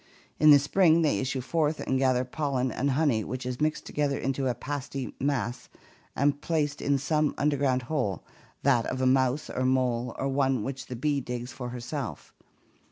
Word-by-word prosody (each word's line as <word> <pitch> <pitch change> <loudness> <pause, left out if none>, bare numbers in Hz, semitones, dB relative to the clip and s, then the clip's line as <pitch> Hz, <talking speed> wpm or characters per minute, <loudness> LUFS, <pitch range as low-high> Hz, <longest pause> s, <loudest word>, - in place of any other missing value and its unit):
In 155 - +6
the 145 - +10
spring 165 +3 +3
they 150 - +2
issue 130 0 -2
forth 155 +3 0
and 130 - 0
gather 130 -1 +2
pollen 130 -2 -1
and 135 +5 -1
honey 135 -5 +2
which 130 +3 -5
is 125 +2 -4
mixed 155 0 0
together 145 -2 -1
into 135 0 -1
a 125 - 0
pasty 135 -1 -5
mass 125 -3 -2 0.5
and 145 +1 +1
placed 150 -3 -1
in 140 0 +2
some 150 +2 0
under 145 0 +2
ground 130 -2 +1
hole, 125 - -2 0.4
that 125 -4 +3
of 130 - -3
a 130 - +1
mouse 130 +2 +2
or 130 - -3
mole 125 -2 +1
or 135 - -1
one 135 -4 +1
which 135 +3 -5
the 125 - -5
bee 140 +3 0
digs 125 0 -5
for 125 -2 -6
herself. 125 +1 -6
135 Hz, 185 wpm, -28 LUFS, 125-145 Hz, 0.5 s, the